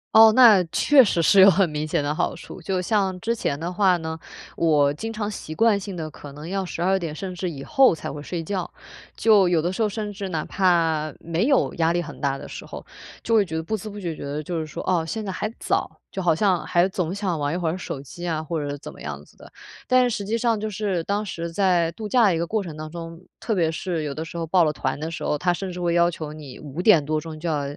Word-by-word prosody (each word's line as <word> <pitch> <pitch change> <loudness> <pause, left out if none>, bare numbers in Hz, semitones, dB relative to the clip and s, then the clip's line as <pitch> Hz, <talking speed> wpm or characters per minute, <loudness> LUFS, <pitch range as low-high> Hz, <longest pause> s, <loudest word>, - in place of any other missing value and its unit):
哦， 220 0 +9
那 225 -7 +8
确 290 -2 +6
实 170 -4 +1
是 195 +5 +5
有 190 +1 +10
很 190 -2 +3
明 150 +1 -3
显 150 - 0
的 145 +1 -1
好 - - -1
处， 185 - -10
就 185 +2 -1
像 190 -1 0
之 230 +1 0
前 150 -10 -2
的 170 +3 -4
话 185 -1 +3
呢， 160 -1 -5 0.4
我 145 -4 +3
经 225 +9 -5
常 210 -1 -3
习 155 -6 -7
惯 225 -1 +3
性 195 -1 -7
地 155 -2 -5
可 145 -2 -11
能 150 +4 -8
要 195 0 -2
12 185 +2 0
点 160 -3 -5
甚 185 +2 -5
至 180 0 -3
以 140 -4 -7
后 270 - +4
才 - - -6
会 145 0 -7
睡 165 +2 -4
觉， 185 +1 -3 0.5
就 210 -5 +5
有 170 -3 +2
的 175 +3 -1
时 190 - -4
候 215 - +3
甚 210 0 -4
至 200 0 -5
哪 160 -4 -2
怕 165 -5 +1
没 170 +6 -1
有 275 -1 +2
压 165 0 +2
力 175 - +1
很 165 - -9
大 140 -1 0
的 - - -10
时 - - -8
候， - - -9 0.4
就 230 - -1
会 205 -2 +4
觉 160 - -6
得 160 - -2
不知不觉 205 -2 -4
觉 150 - -8
得 145 +2 -4
就 170 +1 -3
是 155 - -3
说， - - -6
哦， 175 -3 +1
现 220 +6 -4
在 195 - -3
还 210 +3 -3
早， - - 0 0.2
就 190 - -4
好 170 -3 +3
像 190 -2 +1
还 175 +2 +2
总 180 -2 -2
想 190 -6 -2
玩 145 +1 -1
一 - - -1
会 170 -3 -1
儿 175 - -2
手 145 -6 -6
机 175 +6 -8
啊， 160 -2 -1
或 160 0 -3
者 145 - -4
是 145 - -4
怎 - - -9
么 - - -15
样 75 0 -6
子 - - -23
的。 - - -14 0.4
但 255 0 +5
是， 245 - +2
实 205 -3 -3
际 225 +3 0
上， 230 -2 +1
就 215 0 -3
是， 195 -3 -1
当 205 +1 -1
时 170 -4 -5
在 180 -3 +2
度 210 +3 -6
假 245 0 +4
的 185 -5 +3
一 - - -1
个 170 - -1
过 215 +4 -1
程 170 -5 -7
当 155 0 -7
中， 165 0 -7 0.2
特 220 - -1
别 165 -3 +2
是 165 0 -3
有 145 -2 -3
的 155 +3 -5
时 165 - -11
候 165 -1 -2
报 175 +1 +3
了 150 - 0
团 130 -1 -3
的 160 +1 -3
时 165 - -6
候， 150 - 0
他 175 +3 +1
甚 185 +1 -5
至 180 - -7
会 175 -1 0
要 175 0 +4
求 155 -2 -6
你 145 -5 -10
5 150 +3 -6
点 180 -7 +5
多 155 +1 -1
钟， 160 -2 -8
就 170 - -4
要 150 -3 0
175 Hz, 300 characters per minute, -23 LUFS, 155-200 Hz, 0.5 s, 有